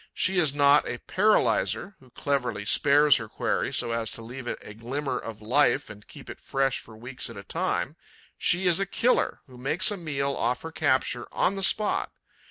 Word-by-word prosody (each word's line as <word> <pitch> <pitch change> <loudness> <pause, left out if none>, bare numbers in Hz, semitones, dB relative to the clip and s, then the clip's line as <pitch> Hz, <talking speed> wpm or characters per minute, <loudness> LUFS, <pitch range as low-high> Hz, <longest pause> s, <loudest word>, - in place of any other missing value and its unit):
She 185 0 +2
is 155 -5 +3
not 145 0 +4
a - - -3
'paralyzer,' 205 0 +1
who 130 - -20
cleverly 125 -6 -2
spares 145 +5 +4
her 110 -2 -7
quarry - - -1
so 115 - +1
as 115 -1 -1
to 115 - -8
leave 125 +2 -8
it - - -3
a 105 - -10
glimmer 125 +4 -4
of 110 -1 -9
life 130 +3 +2
and 105 0 -14
keep - - -13
it - - -10
fresh 135 -1 0
for 110 -1 -12
weeks 125 +2 -4
at 115 - -10
a 100 - -8
time; - - -2 0.4
she 180 +2 +2
is 175 -1 +4
a 195 - -1
killer, 245 +6 +1
who 125 -3 -15
makes 165 +10 +2
a 205 - -3
meal 140 -5 -2
off 125 +2 -1
her 165 - -6
capture 130 -5 0
on 190 - +1
the 195 - -5
spot. 210 +2 +1
135 Hz, 200 wpm, -26 LUFS, 115-165 Hz, 0.4 s, not